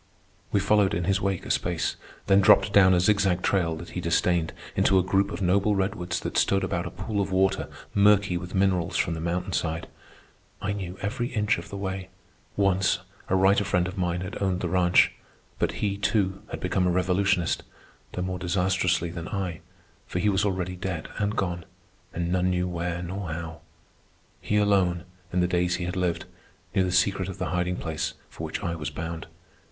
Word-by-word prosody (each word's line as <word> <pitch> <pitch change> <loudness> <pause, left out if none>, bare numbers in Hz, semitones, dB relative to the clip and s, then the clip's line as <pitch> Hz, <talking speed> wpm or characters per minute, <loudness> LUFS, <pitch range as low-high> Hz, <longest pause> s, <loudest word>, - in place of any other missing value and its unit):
We 100 - +3
followed 100 0 +3
in 85 - -1
his 100 +2 +1
wake 95 -2 -1
a - - -2
space, - - 0 0.3
then 100 0 +5
dropped 100 +1 +5
down 95 -2 +7
a - - +3
zigzag 95 -1 +2
trail 85 -4 +1
that 85 +2 -9
he 90 - -4
disdained 85 0 +1 0.2
into 95 - +4
a 95 - +4
group 95 +2 +2
of 100 - -4
noble 100 +3 +3
redwoods 95 -2 -1
that - - 0
stood 95 0 +2
about - - -1
a - - -4
pool 105 -2 -3
of 95 -1 -2
water 95 +1 +1 0.2
murky 100 -2 +4
with 90 +2 -5
minerals 95 -3 +1
from 85 - +1
the 80 - -4
mountain 90 +2 -2
side. 80 0 -1 0.7
I 100 0 -2
knew 95 -2 -5
every 115 +4 -1
inch 105 -3 +1
of - - -10
the 100 - -6
way. 95 -1 -4 0.5
Once 95 -1 +3 0.3
a 95 - +3
writer 95 +2 +4
friend 90 -2 +1
of 95 - -6
mine 90 -2 -1
had 95 +2 -6
owned 95 -2 0
the 90 - -1
ranch; 90 0 +4 0.5
but - - +1
he, 100 -1 -1
too, 100 -2 +1
had - - -5
become 90 -1 +1
a - - +2
revolutionist, 90 0 +1 0.5
though 90 - -2
more 90 0 -3
disastrously 90 -1 +1
than 85 -1 -6
I, 95 -5 -3 0.5
for - - -4
he 100 +3 +2
was 100 0 +2
already 95 -2 -1
dead 90 -3 -4
and 105 +1 0
gone, 90 -2 -2 0.5
and 85 0 -2
none 90 0 +2
knew 90 0 0
where 85 0 -3
nor 95 0 -5
how. 80 0 -6 0.8
He 105 - 0
alone, 95 -4 +2 0.3
in 90 - +1
the 90 - +3
days 90 0 +1
he 90 - -3
had 90 +1 -3
lived, 90 -2 -1 0.5
knew 95 - +3
the 90 - -1
secret 95 0 +2
of 95 - -6
the - - -2
hiding 90 0 0
place 80 -3 -3 0.2
for - - -8
which - - -4
I 85 - -1
was 75 -3 -4
bound. 80 +2 -5
95 Hz, 200 wpm, -26 LUFS, 90-100 Hz, 0.8 s, down